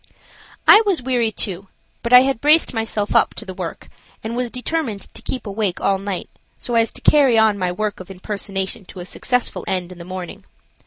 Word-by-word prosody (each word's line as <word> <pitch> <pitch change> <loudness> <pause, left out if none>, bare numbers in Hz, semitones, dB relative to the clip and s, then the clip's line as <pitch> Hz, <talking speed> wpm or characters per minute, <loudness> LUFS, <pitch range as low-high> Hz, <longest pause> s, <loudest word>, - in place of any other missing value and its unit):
I 420 - +9
was 380 - 0
weary, 240 -3 +1
too, 195 -2 -2 0.3
but 235 - -4
I 250 0 +10
had 265 -3 0
braced 305 +1 +4
myself 220 -2 -2
up - - +3
to 220 - -7
the 190 - -7
work, 180 -3 -6 0.4
and 225 +1 -4
was 245 0 -1
determined 250 -4 -3
to - - -10
keep 255 - -5
awake 200 -3 -2
all 195 -1 +1
night 195 -2 -4 0.3
so 240 - -5
as 230 -1 +2
to - - -7
carry 275 -6 +5
on 220 -1 +4
my 180 -1 0
work 210 +2 -3
of 185 +1 -10
impersonation 195 0 -3
to 185 - -11
a 175 - -6
successful 250 +5 -1
end 180 -1 -2
in 180 - -11
the - - -8
morning. 180 -1 -7
215 Hz, 205 wpm, -20 LUFS, 190-250 Hz, 0.4 s, I